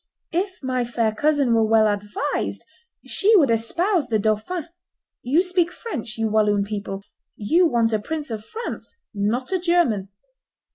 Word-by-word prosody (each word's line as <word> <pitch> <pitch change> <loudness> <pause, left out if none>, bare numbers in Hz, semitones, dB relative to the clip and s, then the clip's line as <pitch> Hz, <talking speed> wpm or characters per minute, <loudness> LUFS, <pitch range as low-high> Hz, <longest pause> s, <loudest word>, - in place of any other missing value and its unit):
If 365 0 -2
my 255 -1 0
fair 230 -2 0
cousin 285 0 +2
were 225 -1 +4
well 220 0 +4
advised, 205 +7 -2 0.4
she 435 +3 +3
would 290 - +5
espouse 325 - +1
the 225 -3 +1
dauphin; 220 - -1 0.5
you 290 +9 +2
speak 360 -2 +1
French, 245 - -6
you 225 0 0
Walloon 210 -1 +2
people; 200 -1 -5 0.3
you 335 - +3
want 230 -5 +1
a 215 - +2
prince 300 +4 -5
of 215 -1 -4
France, 465 - -7
not 220 - -1
a 375 - +1
German. 335 - +1
240 Hz, 150 wpm, -23 LUFS, 215-340 Hz, 0.5 s, would